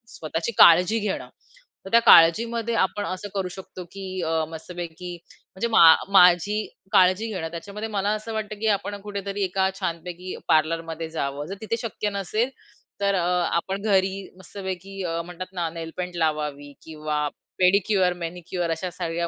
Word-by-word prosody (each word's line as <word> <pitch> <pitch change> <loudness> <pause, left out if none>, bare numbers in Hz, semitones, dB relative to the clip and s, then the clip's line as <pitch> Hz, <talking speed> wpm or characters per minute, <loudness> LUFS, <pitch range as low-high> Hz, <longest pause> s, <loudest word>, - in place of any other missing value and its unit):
स्वतःची 165 +7 -3
काळजी 180 +7 +7
घेणं. 205 -2 -3 0.6
तर - - -7
त्या 235 - +7
काळजीमध्ये 230 +7 +5
आपण 205 +2 -1
असं 185 +2 -5
करू 190 -2 -1
शकतो, 185 -1 -9
की 195 0 -8 0.2
अ, 160 0 +1
मस्तपैकी 175 +1 -7 0.4
म्हणजे 235 +5 -1
मा 220 - +6 0.3
माझी 180 +3 +6 0.3
काळजी 185 +4 +4
घेणं, 165 -3 -3
त्याच्यामध्ये 205 +6 -6
मला 205 -1 -1
असं 220 +1 -6
वाटतं, 215 -1 -4
की 220 - -1
आपण 205 +1 -7
कुठेतरी 200 -1 -4
एका 190 +1 +1
छानपैकी 180 0 -5
पार्लरमध्ये 165 0 0
जावं, 145 -2 -3
जर 195 - -5
तिथे 225 +1 -2
शक्य 215 -2 -3
नसेल 215 +6 -1 0.5
तर 200 0 +2
अ, 175 -1 +1 0.3
आपण 195 +3 -2
घरी 195 -2 +1
मस्तपैकी 190 0 -7
अ, 170 -1 -2
म्हणतात 180 +1 -8
ना, 170 -3 -2
नेलपेंट 170 +2 -6
लावावं 150 -3 -1 0.2
किंवा 150 -1 -3 0.3
पेडिक्युअर, 185 0 +3
मॅनिक्युअर 175 0 -4
अशा 170 +3 -3
सगळ्या 170 -1 -3
185 Hz, 150 wpm, -24 LUFS, 165-200 Hz, 0.6 s, काळजी